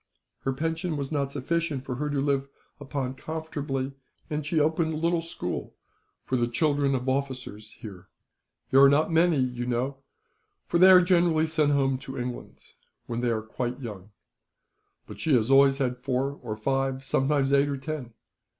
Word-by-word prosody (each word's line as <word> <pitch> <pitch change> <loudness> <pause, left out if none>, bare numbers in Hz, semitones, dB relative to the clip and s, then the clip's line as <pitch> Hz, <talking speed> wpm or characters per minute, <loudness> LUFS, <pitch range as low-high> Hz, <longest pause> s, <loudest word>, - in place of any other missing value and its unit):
Her 135 - -1
pension 160 +4 -2
was 140 0 -4
not 140 -2 -1
sufficient 145 -1 -2
for 130 - -3
her 150 +2 -2
to 145 -1 -1
live 140 -1 0 0.3
upon 135 -2 -3
comfortably, 145 -3 -4 0.4
and 150 0 -1
she 155 +2 0
opened 160 +1 +1
a - - -3
little 170 +1 +1
school 165 - -5 0.5
for 130 - -1
the 120 -1 +1
children 140 +2 +1
of 125 0 -3
officers 130 -6 -3
here. 95 -5 -11 0.6
"There 135 - +6
are 140 - +9
not 150 +4 +2
many, 165 -1 +4
you 125 -2 -1
know, 125 +3 -1 0.7
for 170 - 0
they 185 +1 +8
are 185 -1 +9
generally 170 -3 +3
sent 155 -2 +2
home 135 -2 +1
to 135 0 -8
England, 125 0 -6 0.4
when 120 0 -3
they 120 - +1
are 110 -2 -1
quite 120 +3 -4
young. 105 -6 -8 1.0
But - - -11
she 155 -4 +3
has 115 +1 +2
always 135 0 +6
had 125 -2 -1
four 130 +1 -1
or 110 -4 -4
five, 135 +3 -1
sometimes 135 +1 +1
eight 140 +1 +4
or 140 - -2
ten. 135 -4 -6
135 Hz, 175 wpm, -27 LUFS, 125-155 Hz, 1.0 s, are